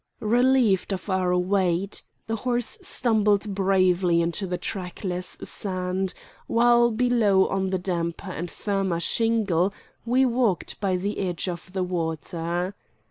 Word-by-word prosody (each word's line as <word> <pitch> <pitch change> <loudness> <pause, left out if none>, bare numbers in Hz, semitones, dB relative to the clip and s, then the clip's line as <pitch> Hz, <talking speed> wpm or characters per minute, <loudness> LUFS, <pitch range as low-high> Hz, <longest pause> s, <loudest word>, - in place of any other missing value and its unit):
Relieved 235 -4 +3
of 190 +1 -4
our 180 -1 +2
weight, 185 0 0 0.2
the 225 0 -2
horse 240 0 -2
stumbled 210 -3 +1
bravely 185 -3 +3
into 170 +4 -1
the 180 0 -2
trackless 180 -1 -4
sand, 185 -1 -2 0.3
while 240 0 +4
below 225 -5 +3
on 190 -1 -1
the 190 - 0
damper 175 0 -3
and 175 0 -4
firmer 195 -4 -1
shingle 200 -2 +1 0.3
we 255 +3 +3
walked 235 -6 0
by 190 -3 +1
the 200 +3 -3
edge 180 -1 -2
of 180 +1 -5
the 190 -1 0
water. 170 +1 -2
190 Hz, 130 wpm, -25 LUFS, 180-215 Hz, 0.3 s, while